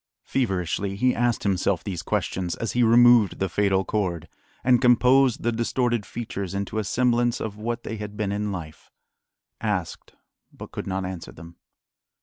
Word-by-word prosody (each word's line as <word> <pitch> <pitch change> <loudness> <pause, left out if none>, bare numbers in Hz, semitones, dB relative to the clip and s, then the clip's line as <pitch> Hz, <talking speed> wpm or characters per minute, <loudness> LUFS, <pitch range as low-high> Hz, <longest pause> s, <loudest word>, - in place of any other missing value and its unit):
Feverishly 95 -4 -1
he 125 +5 +2
asked 120 -1 0
himself 95 -2 0
these 90 -4 -4
questions 90 -2 -2
as 115 - -3
he 125 - +1
removed 120 -2 +6
the 95 - 0
fatal 95 +1 +1
cord, 90 -6 -2 0.4
and 125 -1 +4
composed 125 0 +4
the 120 - +1
distorted 120 -1 -1
features 100 -5 -5
into 100 +2 -2
a - - -1
semblance 120 +2 +1
of 105 -2 -4
what 120 +2 -3
they 110 - -5
had 105 0 -7
been 105 -2 -1
in 105 0 -2
life; 80 -5 -8 0.7
asked, 105 -6 -3 0.4
but - - -11
could - - -6
not 95 0 -2
answer 95 -2 -6
them. 85 +2 -13
105 Hz, 160 wpm, -24 LUFS, 95-120 Hz, 0.7 s, removed